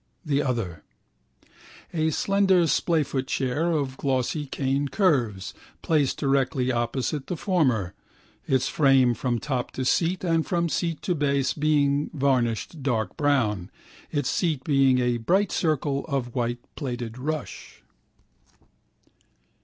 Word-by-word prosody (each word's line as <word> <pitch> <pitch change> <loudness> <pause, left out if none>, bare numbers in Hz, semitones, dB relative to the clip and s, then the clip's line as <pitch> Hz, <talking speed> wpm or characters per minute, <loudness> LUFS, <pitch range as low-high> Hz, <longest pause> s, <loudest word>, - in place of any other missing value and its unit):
The 145 -2 +1
other: 105 - -2 1.1
a 160 -1 +1
slender 195 +2 +3
splayfoot 145 -5 0
chair 135 +7 0
of 140 -4 -1
glossy 135 +2 -1
cane 135 +1 -1
curves, 130 - +1 0.3
placed 150 -5 +1
directly 135 -2 +1
opposite 130 +4 -2
the 180 - -3
former, 130 - +1 0.5
its 130 -1 +2
frame 135 -4 +4
from 120 0 -1
top 130 -1 -2
to 130 - -3
seat 175 +7 +1
and 165 -2 +2
from 170 -1 0
seat 165 -1 -2
to 180 - +1
base 140 -4 +1
being 145 -1 +1
varnished 135 +1 0
dark 115 -7 -1
brown, 115 -11 +1 0.4
its 145 -4 0
seat 155 -7 0
being 135 -3 +3
a 125 -1 +1
bright 190 - +1
circle 145 -4 0
of 135 -5 -2
white 120 -1 -2
plaited 120 -4 -5
rush. 150 +1 -5
140 Hz, 120 wpm, -25 LUFS, 125-155 Hz, 1.1 s, frame